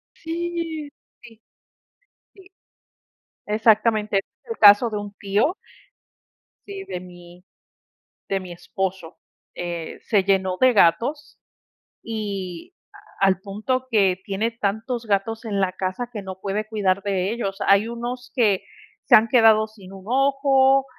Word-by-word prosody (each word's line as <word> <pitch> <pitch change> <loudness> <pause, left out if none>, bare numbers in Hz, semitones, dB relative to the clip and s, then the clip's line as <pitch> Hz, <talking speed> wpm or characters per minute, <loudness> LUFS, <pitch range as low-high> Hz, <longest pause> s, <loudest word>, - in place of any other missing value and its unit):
Sí, 330 -2 -4 0.3
sí, 225 -1 -16 0.9
sí, 385 -2 -17 1.0
exactamente, 215 -1 +2
es 195 - 0 0.3
el 455 - -4
caso 205 +3 +7
de 215 - -4
un 205 0 -6
tío, 210 - 0 1.1
sí, 395 -1 -8
de 180 - -6
mi 175 0 -14 0.8
de 195 -1 -1
mi 185 -2 -9
esposo, 180 0 -5 0.4
eh, 170 -2 -5
se 205 -4 +2
llenó 190 -1 +1
de 255 0 +6
gatos 240 - +1 0.7
y 200 - -5 0.5
al 195 -2 +3
punto 215 +7 -3
que 195 -5 +3
tiene 210 +4 -1
tantos 230 +3 -3
gatos 215 +3 -1
en 205 -3 -2
la 190 -1 +1
casa 185 +6 -4
que 215 -4 -6
no 190 -1 -8
puede 205 +2 -3
cuidar 200 -3 0
de 195 -1 -1
ellos, 200 -4 -3
hay 200 +2 +4
unos 240 +2 -6
que 210 -7 +2 0.4
se - - +7
han 220 +1 +5
quedado 220 -2 +5
sin 200 -4 -15
un 190 -1 -11
ojo, 270 +1 +3
210 Hz, 130 wpm, -23 LUFS, 195-240 Hz, 1.1 s, caso